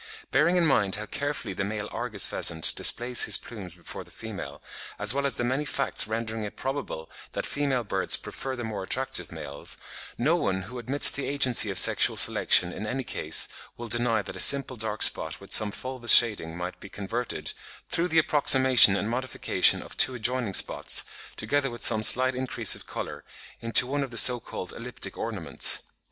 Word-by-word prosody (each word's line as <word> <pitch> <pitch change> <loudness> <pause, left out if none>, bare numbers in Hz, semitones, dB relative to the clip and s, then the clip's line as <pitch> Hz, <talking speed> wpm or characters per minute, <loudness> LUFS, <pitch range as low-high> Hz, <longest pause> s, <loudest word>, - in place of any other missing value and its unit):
Bearing 175 - 0
in 175 - 0
mind 105 -10 0
how 105 +1 -7
carefully 140 -6 -6
the 95 - -5
male 105 +1 -6
Argus 110 -4 +2
pheasant 80 -2 0
displays 120 +1 +4
his - - +4
plumes 95 -7 -12
before 85 - -12
the - - -20
female, 95 -11 -11 0.4
as - - 0
well 140 0 -3
as 140 - +1
the - - -4
many 130 +4 -3
facts 140 -5 -2
rendering 110 0 -6
it 105 - -9
probable 135 - -7 0.3
that - - -5
female 140 -4 -3
birds 95 -3 -1
prefer 135 -1 -8
the 120 - -8
more 110 -3 -7
attractive 130 +7 -3
males, 70 +1 -7 0.4
no - - -1
one 95 0 -4
who 125 +6 -11
admits 135 +5 +7
the 140 - -5
agency 130 -6 +2
of 95 - -6
sexual - - +4
selection 90 0 +3
in 105 - -8
any 130 +4 -5
case - - 0 0.3
will 120 - -9
deny 115 -2 -1
that - - -11
a - - -9
simple 135 -2 +5
dark 110 -2 -2
spot 80 0 +1
with 100 - -17
some 110 -1 +4
fulvous 130 +2 +5
shading 100 -8 +2
might 90 +1 -8
be 100 - -14
converted, 110 +5 -6 0.3
through 170 +1 -3
the 165 - -3
approximation 130 -8 +4
and 100 - -4
modification 125 +2 0
of - - -13
two 130 - +1
adjoining 120 -3 -3
spots, - - +2 0.3
together 145 -1 -3
with 120 -1 -8
some 110 -2 +6
slight 130 +4 +1
increase 125 -5 0
of - - -7
colour, - - -9 0.4
into 115 +2 +2
one 140 +3 -5
of 135 - -6
the 115 - -9
so 125 +1 +6
called 90 -4 -9
elliptic 125 +1 -8
ornaments. 100 -11 -1
120 Hz, 190 wpm, -24 LUFS, 105-130 Hz, 0.4 s, admits